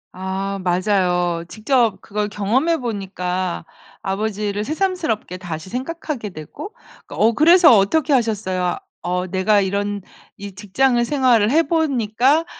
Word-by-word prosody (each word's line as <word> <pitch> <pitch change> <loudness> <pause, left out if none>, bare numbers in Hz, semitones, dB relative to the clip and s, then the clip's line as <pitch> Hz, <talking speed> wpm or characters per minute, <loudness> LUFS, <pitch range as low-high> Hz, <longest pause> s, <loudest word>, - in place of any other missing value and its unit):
아 190 +1 -3
맞아요. 180 -2 +1
직접 230 0 +1
그걸 210 0 -3
경험해 245 +12 +1
보니까 185 - -3 0.4
아버지를 205 +1 -2
새삼스럽게 315 - -2
다시 175 -1 -7
생각하게 265 -2 -4
되고 200 - -9 0.3
어 225 - +2
그래서 335 - +6
어떻게 280 +10 +2
하셨어요? 195 -7 0 0.2
"어 180 +1 -2
내가 190 +3 +2
이런 200 +1 -2 0.4
이 200 0 -8
직장을 240 +5 +1
생활을 240 -5 +3
해 315 +6 +4
보니까 275 -2 +1
210 Hz, 275 characters per minute, -20 LUFS, 190-265 Hz, 0.4 s, 그래서